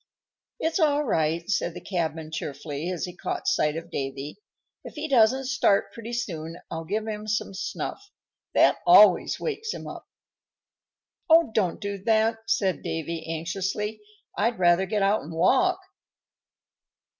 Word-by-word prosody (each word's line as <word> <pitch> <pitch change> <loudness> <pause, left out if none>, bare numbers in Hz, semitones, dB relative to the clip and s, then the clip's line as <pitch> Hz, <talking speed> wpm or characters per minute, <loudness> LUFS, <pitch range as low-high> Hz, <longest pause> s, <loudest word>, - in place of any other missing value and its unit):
"It's 325 +3 0
all 300 -2 +3
right," 165 - 0
said 180 -4 -1
the - - -6
cabman, 160 -4 -3
cheerfully, 150 +1 -5
as 180 -3 -2
he 180 - -9
caught 365 +1 -4
sight 150 - +2
of 165 +1 -7
Davy. 135 +3 -4 0.5
"If - - -10
he 305 +1 -4
doesn't 260 0 +4
start 205 -7 +2
pretty 230 0 -8
soon 165 -8 -4
I'll 165 0 -4
give 210 +5 -2
him 215 0 -5
some 210 -2 -1
snuff. 400 - -5 0.5
That - - +5
always - - +6
wakes 445 -1 -3
him - - -8
up." - - -9 1.2
"Oh! 325 -5 +6
don't 190 -6 0
do 200 -2 -4
that," 225 +2 +2
said 195 -4 +1
Davy, 165 0 -4
anxiously. 190 +6 -3 0.3
"I'd 230 +3 0
rather 175 +1 +3
get 205 +1 0
out 200 +2 +2
and 160 +3 -9
walk." 270 - +3
195 Hz, 145 wpm, -26 LUFS, 165-230 Hz, 1.2 s, always